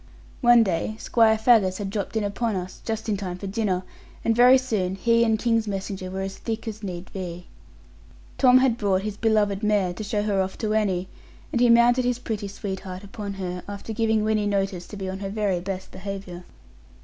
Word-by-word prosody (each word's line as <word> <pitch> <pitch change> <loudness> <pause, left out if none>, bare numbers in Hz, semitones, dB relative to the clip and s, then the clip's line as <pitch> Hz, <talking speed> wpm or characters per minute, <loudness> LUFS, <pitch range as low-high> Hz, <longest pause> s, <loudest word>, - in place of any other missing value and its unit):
One 240 -1 +7
day 190 +2 -1
Squire 225 -1 +3
Faggus 220 -5 +4
had 200 -2 -4
dropped 205 +1 -3
in 215 - 0
upon 210 +2 -1
us, 185 0 -6
just 220 0 -3
in 210 -2 0
time 185 -2 -5
for 200 - -7
dinner; 195 -2 -1 0.4
and 225 - +3
very 250 +2 +7
soon 205 -8 -1
he 230 +4 +3
and 220 -1 +2
King's 230 -1 +1
messenger 195 -1 -4
were 190 +1 -4
as 195 0 -5
thick 225 0 -4
as 215 -1 -5
need 180 -3 -7
be. 180 -2 -6 0.9
Tom 255 -2 +7
had 255 -2 +2
brought 195 -2 +1
his 210 -1 -3
beloved 210 -2 +1
mare 205 -4 +1
to 195 - -6
show 205 0 -1
her 200 -2 +1
off 190 0 -3
to 215 -2 -1
Annie, 190 -4 0 0.4
and 240 - 0
he 245 - +5
mounted 240 +2 +5
his 245 -1 0
pretty 220 -4 -4
sweetheart 190 -1 -6
upon 200 0 -6
her, 180 -2 -4
after 205 +2 -6
giving 220 -1 +1
Winnie 215 -1 +1
notice 195 -3 -1
to 205 - -9
be 190 -1 -4
on 190 +1 -4
her 195 -1 -4
very 200 -3 0
best 190 +1 -5
behaviour. 190 -2 -7
205 Hz, 205 wpm, -25 LUFS, 190-225 Hz, 0.9 s, One